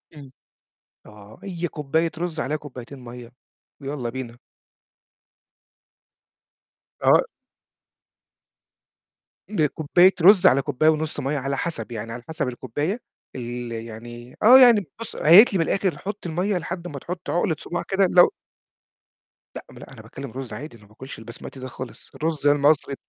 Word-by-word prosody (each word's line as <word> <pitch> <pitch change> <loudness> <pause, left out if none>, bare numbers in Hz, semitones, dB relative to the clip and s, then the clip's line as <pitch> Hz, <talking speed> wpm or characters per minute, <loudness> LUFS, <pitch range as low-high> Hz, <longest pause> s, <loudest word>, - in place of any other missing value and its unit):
إمم، 140 -3 -12 0.7
آه 105 0 -15
هي 175 -3 -4
كوباية 160 +2 -1
رز 165 -2 -4
عليها 155 +2 -1
كوبايتين 135 -2 -10
مَيّة، 120 -1 -11 0.5
ويالّا 135 -3 -4
بينا. 120 -1 -7 2.6
آه. - - +5 2.3
بكوباية 175 0 +3
رز، 190 +1 +7
على 140 -5 +4
كوباية 145 +2 +2
ونص 155 0 -1
مَيّة 140 +3 -2
على 135 0 -3
حسب، 170 -6 -4
يعني 115 0 -6
على 120 +1 -8
حسب 160 -3 -2
الكوباية 145 - -3 0.3
ال 120 -1 -5
يعني 115 +2 -9
آه، 250 +5 +9
يعني 235 -6 +6
بُص 230 - -6
هي 160 +3 +5
قالت 215 +1 +8
لي 190 - +1
من 165 - +2
الآخر 195 -3 0
حُط 205 0 -7
المَية 180 +4 -1
لحد 175 +1 -5
ما 145 -4 -7
تحُط 175 +5 -7
عُقلة 175 -1 0
صوباع 175 - -4
كده 195 0 +2
لو 175 -1 +7 1.3
لأ - - -8
ما - - -15
أنا - - -12
أنا - - -12
باتكلم 135 -2 -9
رز 130 -2 -7
عادي، 135 +4 -8
أنا 105 - -21
ما 105 - -20
باكلش 130 +5 -10
البسمتي 115 +4 -9
ده 130 - -6
خالص، 130 -1 -9
الرز 155 -2 -1
المصري. 145 0 +3
145 Hz, 150 wpm, -23 LUFS, 125-175 Hz, 2.6 s, آه